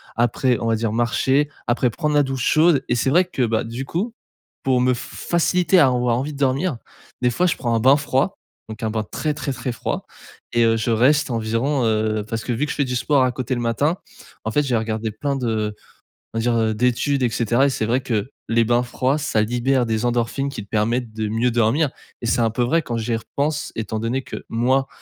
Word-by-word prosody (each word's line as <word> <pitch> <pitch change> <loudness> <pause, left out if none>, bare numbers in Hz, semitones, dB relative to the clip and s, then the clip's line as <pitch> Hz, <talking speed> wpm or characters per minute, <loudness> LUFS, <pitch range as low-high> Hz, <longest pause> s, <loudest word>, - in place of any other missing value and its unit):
après, 120 +1 +1
on 115 - -2
va 115 - +2
dire 110 -1 -1
marcher, 130 +5 +2 0.2
après 120 +1 +2
prendre 150 +5 -1
la 145 - +5
douche 135 -2 -2
chaude 155 -3 +4
et 120 - +2
c'est 125 +3 +1
vrai 180 +6 +4
que 175 -7 -4
bah, 110 0 0
du 120 +4 -5
coup, 205 - -2 0.5
pour 130 -2 +2
me 125 0 +3
f 120 - -4
f - - -9
faciliter 180 +2 +3
à 140 - +6
avoir 125 -2 +1
envie 145 +3 -3
de - - -9
dormir, 140 +2 +1 0.5
des 125 - +3
fois 180 +9 +2
je 170 - +1
prends 120 -3 -1
un 115 - +2
bain 135 +5 +6
froid, 145 +5 0 0.3
donc 110 +2 -8
un 110 - 0
bain 110 0 -1
très, 150 +8 -2
très, 145 -2 -4
très 125 -1 -4
froid 120 - -4 0.5
et 120 - +3
heu, 115 0 +3
je 115 +2 -1
reste 135 +5 +3
environ, 115 +4 0
heu, 110 -1 +1
parce 115 -1 -3
que 125 - -2
vu 135 +6 0
que - - -4
je - - -4
fais 140 - +2
du 125 0 -3
sport 135 +1 +2
à 130 - +2
côté 130 0 -3
le 120 - -3
matin, 140 +9 +1 0.5
en 110 - -1
fait, 150 - +2
j'ai 125 -4 +1
regardé 110 0 -2
plein 140 +6 -2
de 110 -4 -1 0.6
on - - -3
va - - 0
dire, 120 0 +1
heu, 110 -1 +1
d'études 125 +4 +1
et 120 - +3
cetera 120 +4 +2
et - - +2
c'est 110 -4 -1
vrai 125 +4 +1
que 115 -1 -2 0.2
les 115 0 +3
bains 120 +1 +2
froids, 130 +3 0
ça 145 -8 0
libère 120 +2 +1
des 110 +1 0
endorphines 120 +3 0
qui 115 -7 -6
te 100 - -19
permettent 115 +2 0
de 110 -1 -2
mieux 115 +3 +1
dormir, 120 +7 +2 0.3
et 120 - -3
c'est 120 - +2
un 115 -1 +2
peu 125 - -2
vrai 165 +7 +2
quand 120 - -4
j'y 115 +1 -1
repense, 145 +6 -2
étant 110 0 -3
donné 120 +4 -1
que - - -8
moi, 130 +4 +1
125 Hz, 240 wpm, -21 LUFS, 115-140 Hz, 0.6 s, à